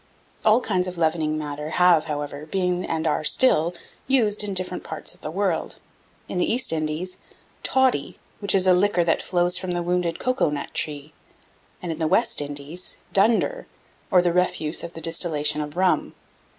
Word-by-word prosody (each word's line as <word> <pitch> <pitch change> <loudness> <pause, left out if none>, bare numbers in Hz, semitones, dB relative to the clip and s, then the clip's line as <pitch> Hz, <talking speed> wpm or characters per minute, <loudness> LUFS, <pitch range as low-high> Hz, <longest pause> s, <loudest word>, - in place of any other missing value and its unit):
All 220 +3 +5
kinds 185 -6 0
of 180 -1 -6
leavening 160 -2 0
matter 150 0 -5
have, 175 -2 +4
however, 145 -1 -5
been, 180 0 0
and 160 0 -2
are 155 0 +1
still 170 -4 +3 0.3
used 220 -6 +3
in 200 -2 -2
different 185 0 -2
parts 160 - -6
of - - -22
the - - -5
world: 185 -1 -1 0.5
in 180 - -3
the - - +1
East 240 -6 +2
Indies, 155 +3 -3 0.4
"toddy," 260 - +1 0.2
which 200 -1 +1
is 190 -1 +3
a 185 - +6
liquor 180 -1 +3
that 165 -1 +1
flows 175 -1 0
from 185 -1 -3
the 175 0 -1
wounded 175 -1 0
cocoa 255 - +1
nut 145 -1 -4
tree; 150 0 -3 0.7
and, 175 - -3
in 160 - -5
the 160 - +1
West 155 - +2
Indies, 145 +5 -5 0.2
"dunder," 230 - +2 0.4
or 180 -1 +5
the 175 -1 +1
refuse 180 -3 0
of 170 0 -7
the 165 - -8
distillation 155 -2 +1
of 150 +2 -6
rum. 185 -1 +1
175 Hz, 175 wpm, -24 LUFS, 155-185 Hz, 0.7 s, a